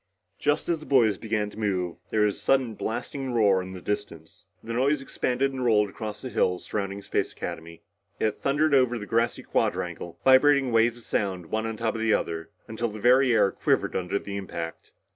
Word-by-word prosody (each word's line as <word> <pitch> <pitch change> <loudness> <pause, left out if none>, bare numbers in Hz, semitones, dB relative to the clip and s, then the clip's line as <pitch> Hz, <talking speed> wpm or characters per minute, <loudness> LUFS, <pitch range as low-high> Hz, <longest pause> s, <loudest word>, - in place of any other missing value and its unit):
Just 145 +1 +1
as 170 -2 0
the 155 - -12
boys 120 -7 +3
began 105 -2 -2
to 105 - -11
move, 90 -5 -1
there 110 - +1
was 105 -1 +2
a - - -4
sudden 130 -4 +2
blasting 130 +4 -4
roar 100 -5 +4
in 95 0 -8
the 95 - -7
distance. 105 -6 -5 0.2
The 115 - -5
noise 135 +5 +2
expanded 135 0 -1
and 130 -1 -3
rolled 105 -4 +3
across 110 +2 -6
the 130 - -4
hills 90 0 0
surrounding 100 -1 -3
Space - - -1
Academy. 85 +1 -7 0.4
It 110 - -1
thundered 150 +2 +2
over 125 -3 +4
the 105 - -6
grassy 115 +3 0
quadrangle, 85 - -2
vibrating 135 0 +5
waves 115 +1 +3
of 120 - -12
sound 95 -5 -2
one 110 +1 -1
on 110 -1 -4
top 115 0 -1
of 115 - -4
the 110 -1 +3
other, 80 +2 -3 0.2
until 115 +2 -2
the 110 -1 -7
very 125 +3 +5
air 100 - +4
quivered - - 0
under 90 +1 -1
the 100 0 -5
impact. 85 -4 -6
110 Hz, 200 wpm, -26 LUFS, 100-130 Hz, 0.4 s, vibrating